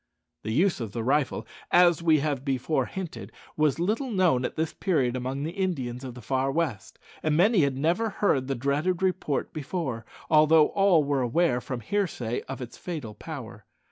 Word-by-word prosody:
The 110 - -4
use 175 - +2
of 110 -4 -5
the 115 - -3
rifle, 135 -3 0 0.2
as 175 -2 +5
we 160 -3 +4
have 140 -3 -1
before 135 0 0
hinted, 190 -4 -7 0.2
was 150 -3 +2
little 215 +10 -1
known 180 - +2
at - - -4
this 160 0 -2
period 135 -10 0
among 130 +2 -3
the 160 - -3
Indians 140 -10 -3
of 125 -2 -7
the 125 - -11
far 130 +3 0
west, 145 -8 -2 0.2
and 155 -1 +1
many 200 +4 +4
had 140 -2 +1
never 175 +10 +1
heard 140 -11 +1
the 135 - -1
dreaded 150 +8 0
report 185 -6 -1
before, 145 -6 -4 0.2
although 155 0 +5
all 195 -6 +4
were 140 -1 0
aware, 125 +1 +1
from 125 -2 -5
hearsay, 125 - -2
of 135 -1 -5
its 120 - -11
fatal 150 -12 -5
power. 115 -5 -9
150 Hz, 180 wpm, -27 LUFS, 130-175 Hz, 0.2 s, as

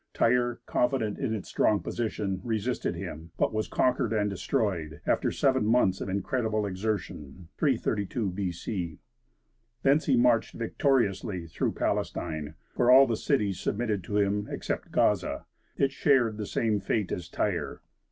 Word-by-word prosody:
Tyre, 120 0 +2
confident 125 -5 0
in 135 -5 -1
its 100 - -6
strong 105 - +2
position, 100 -1 -3
resisted 115 +1 -1
him, 80 +2 -7
but - - +1
was 110 0 -1
conquered 125 -2 +1
and 105 -2 +1
destroyed, 95 - -1
after - - +2
seven 130 -3 +2
months 105 -4 +2
of - - -3
incredible 110 +2 -1
exertion 95 -5 -4
(332 110 - 0
B.C.) 90 -2 -4 0.9
Thence 140 +3 +3
he 135 -4 +4
marched 120 -2 +3
victoriously 110 - 0
through 80 - -2
Palestine, 80 -1 -2 0.2
where 120 - +3
all 130 +2 +9
the 115 - 0
cities 105 -7 0
submitted 105 -3 -1
to 105 - -1
him 105 0 +1
except - - -4
Gaza; - - +1 0.3
it 135 -1 +2
shared 125 -6 +2
the 105 -2 -4
same 110 -3 0
fate 100 0 -1
as 90 - -4
Tyre. - - -2
105 Hz, 140 wpm, -28 LUFS, 95-120 Hz, 0.9 s, all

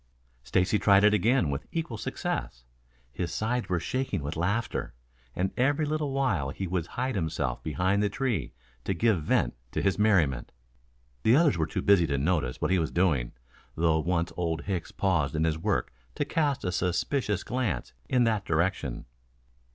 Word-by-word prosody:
Stacy 90 - +1
tried 100 -1 +5
it 105 0 +6
again 110 - +3
with 70 - -4
equal 160 -8 -3
success. - - -3 0.5
His 85 +6 -3
sides 110 +2 -1
were 90 -2 +1
shaking 130 - -2
with 75 +3 -4
laughter, 95 - -1 0.4
and 95 +1 0
every 145 +4 +2
little 150 -1 -1
while 125 - 0
he 95 +7 -4
would 90 -2 -2
hide 130 +1 -2
himself 80 - -2
behind 95 +6 0
the 105 - +2
tree 130 -1 -1 0.3
to 95 - -1
give 105 -2 +2
vent 75 - +1 0.2
to - - 0
his 95 0 +1
merriment. 85 - +2 0.7
The 115 - +5
others 155 -1 +4
were 80 -1 0
too - - -3
busy 95 -5 +5
to 70 -1 0
notice 70 -4 0
what - - 0
he 95 - +3
was 80 -2 0
doing, 80 -10 +1 0.4
though 80 -1 +2
once 85 +1 -1
Old 85 -2 -2
Hicks 95 -4 -3
paused 85 -8 0
in 80 - +1
his 80 -1 0
work - - -1 0.2
to - - -1
cast 145 -4 0
a 90 - -1
suspicious 100 - 0
glance 125 - -2 0.2
in 125 -1 +3
that 110 -4 +1
direction. 80 -7 -1
90 Hz, 175 wpm, -28 LUFS, 80-115 Hz, 0.7 s, it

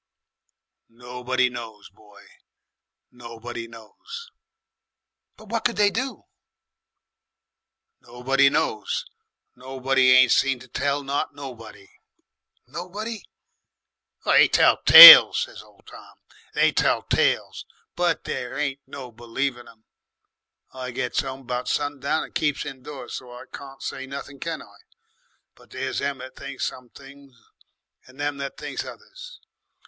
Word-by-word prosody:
"Nobody 125 +2 -3
knows, 115 -5 -10
boy, 105 0 -20 0.9
nobody 115 -1 -9
knows." 425 - -12 1.1
"But 215 -1 -16
what 230 0 -3
could 240 - 0
they 205 -1 +2
do?" 255 -1 -5 1.8
"Nobody 135 +3 +1
knows. 110 -5 -2 0.5
Nobody 130 0 0
ain't 130 -1 +5
seen 135 -1 +2
to 125 +1 -15
tell 140 +3 -2
not 140 +1 -3
nobody." 115 -8 -11 0.8
"Nobody?" 205 +5 -7 1.0
"They - - +5
tell - - +3
tales," 445 - +11
said - - -7
old - - -24
Tom. - - -15 0.4
"They - - +3
tell - - 0
tales, - - -1 0.3
but 175 0 -1
there 125 +2 -6
ain't 140 -2 -3
no 130 -3 -10
believing 120 +2 -5
'em. 110 -1 -19 0.9
I 130 -1 -7
gets 125 - -2
'ome 135 0 -7
about 125 -1 -5
sundown, 145 +1 -2
and - - -13
keeps 150 -2 -2
indoors, 135 0 -9
so 125 -2 -12
I 125 - -11
can't 135 -1 -11
say 135 0 -6
nothing, 140 0 -9
can 165 +1 -5
I? - - -20 0.8
But - - -22
there's - - -4
them 140 -1 -3
that 130 +1 -11
thinks 140 -1 -6
some 125 -1 -8
things 140 -2 -17 0.7
and 130 +2 -19
them 145 -1 -3
as 140 - -5
thinks - - -6
others. - - -13
135 Hz, 125 wpm, -23 LUFS, 125-145 Hz, 1.8 s, tales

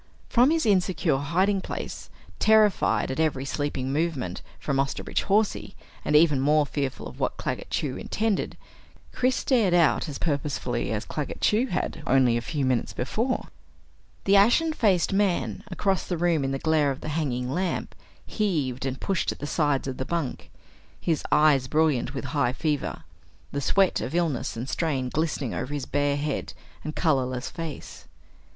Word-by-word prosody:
From 250 +2 +5
his 320 -3 +1
insecure 185 -7 +2
hiding 185 +8 +1
place, - - -6 0.3
terrified 215 -9 +3
at 130 - -4
every 145 -4 +1
sleeping 140 -2 -2
movement 145 - -1 0.2
from 140 -2 -1
Osterbridge 135 0 -1
Hawsey, 210 +1 +1 0.3
and 150 - +1
even 150 -3 +5
more 150 +2 +4
fearful 140 -2 -3
of - - -12
what - - -1
Claggett - - -4
Chew - - -2
intended, 220 -2 -1 0.5
Chris 255 0 +1
stared 220 -9 +2
out 170 -1 +3
as 140 - -5
purposefully 140 -6 -2
as 110 -1 -2
Claggett 150 -2 -4
Chew 225 +5 +3
had 180 - -3
only 130 -3 +4
a 120 - 0
few 145 +2 -2
moments 130 -2 0
before. 230 - -2 0.7
The 200 - +4
ashen 240 +11 +5
faced 195 - +2
man 195 -1 0
across 190 0 0
the 175 - -1
room 165 -3 +2
in 135 - 0
the 135 - -1
glare 155 0 +2
of 135 - -4
the - - -5
hanging 130 -5 -1
lamp 180 +5 -2 0.3
heaved 145 - -1
and 135 0 -4
pushed 195 -4 0
at - - -7
the - - -5
sides 145 -3 0
of 130 -1 -4
the - - -2
bunk, 165 -2 -3 0.5
his 165 -3 -1
eyes 145 -4 +4
brilliant 150 -3 +1
with 135 - -4
high 140 -4 +2
fever; 150 0 -2 0.5
the 140 - -2
sweat 195 +6 +2
of 135 - -4
illness 160 -10 -1
and 120 +3 -4
strain 135 -4 -1
glistening 150 -4 -1
over 135 - -4
his 145 - -3
bare 145 0 0
head 145 -1 -3 0.3
and 155 - -5
colorless 130 -6 0
face. 165 -4 -7
150 Hz, 165 wpm, -26 LUFS, 135-185 Hz, 0.7 s, From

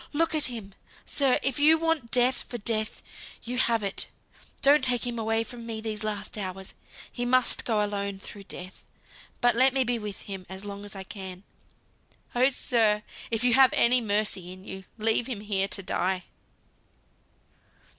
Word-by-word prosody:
Look 325 +2 +1
at 310 -2 +4
him, 220 -6 -4 0.3
sir. 270 -3 +2
If 270 0 0
you 310 +2 +6
want 325 -7 0
Death 250 +2 +3
for 240 - -4
Death, 215 -1 -1 0.4
you 250 +1 -3
have 230 -3 +2
it. 195 -1 -2 0.6
Don't 285 0 +6
take 250 -1 +2
him 240 -1 -3
away 225 0 0
from 235 +1 -9
me 225 -1 -5
these 220 -1 -4
last 210 0 -4
hours. 190 -1 -6 0.4
He 245 - -4
must 255 +1 +2
go 215 -3 +1
alone 200 -1 -3
through 200 +1 -10
Death, 185 +1 -8 0.6
but 245 0 +4
let 260 +2 +4
me 265 - +3
be 240 -1 -1
with 210 -2 -6
him 195 -2 -7
as 190 +1 -8
long 200 0 -7
as 205 - -9
I 190 - -6
can. 190 -1 -8 0.9
Oh, 255 +2 +4
sir! 220 -5 +2 0.3
if 225 0 -1
you 245 -1 +4
have 265 0 +6
any 245 +1 +5
mercy 205 -4 0
in 185 +1 -11
you, 190 -1 -7
leave 225 +2 +3
him 235 -6 -4
here 200 -2 +2
to 195 0 0
die." 185 0 -1
220 Hz, 175 wpm, -27 LUFS, 200-250 Hz, 0.9 s, you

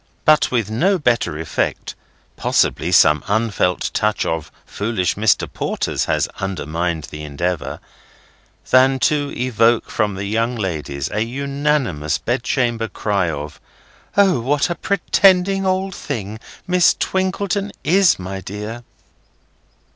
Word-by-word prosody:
But 155 -1 +5
with 115 -4 -1
no 185 - +2
better 120 - 0
effect—possibly 80 0 -2
some 75 +1 +5
unfelt 105 -4 0
touch 105 0 0
of 80 -2 -3
foolish 100 -4 -1
Mr. 105 -1 +2
Porters - - -2
has - - 0
undermined 85 -3 -2
the 75 - -7
endeavour—than 90 - -2
to 145 -2 +1
evoke 120 -2 +2
from 105 -3 0
the 100 +1 -4
young 115 +4 0
ladies 75 -9 -3
an 110 +2 -1
unanimous 140 - -1
bedchamber 120 -1 -1
cry 100 -5 -1
of 75 0 -6 0.6
"O, 195 -7 +4
what 140 +7 0
a - - -1
pretending 195 +1 +2
old 190 +1 0
thing 110 - -5 0.3
Miss 180 -1 +4
Twinkleton 195 +2 -1
is, 190 +2 +4
my 95 +1 -6
dear!" 105 +5 -7
115 Hz, 115 wpm, -19 LUFS, 95-150 Hz, 0.6 s, But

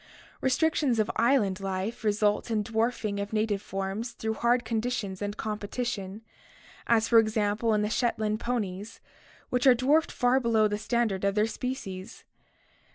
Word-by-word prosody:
Restrictions 270 -1 +2
of 215 -1 +1
island 225 -7 +2
life 195 +4 -3
result 210 +1 +1
in 215 -2 0
the 205 - -11
dwarfing 220 -2 0
of 200 +1 -4
native 215 -2 0
forms 195 +4 -4
through 220 0 -3
hard 240 +2 +1
conditions 220 -4 -2
and 205 +1 -3
competition, 215 -1 -4 0.6
as 230 -1 +3
for 230 - +6
example 215 0 +1
in 210 - +1
the 210 - -1
Shetland 220 -3 0
ponies, 210 -4 -3 0.5
which 250 +1 +2
are 255 - +8
dwarfed 290 +6 +2
far 250 +2 +2
below 225 -3 +3
trje 210 0 -3
standard 220 -4 0
of 200 0 +1
their 210 0 +3
species. 225 -5 -6
220 Hz, 155 wpm, -28 LUFS, 205-240 Hz, 0.6 s, are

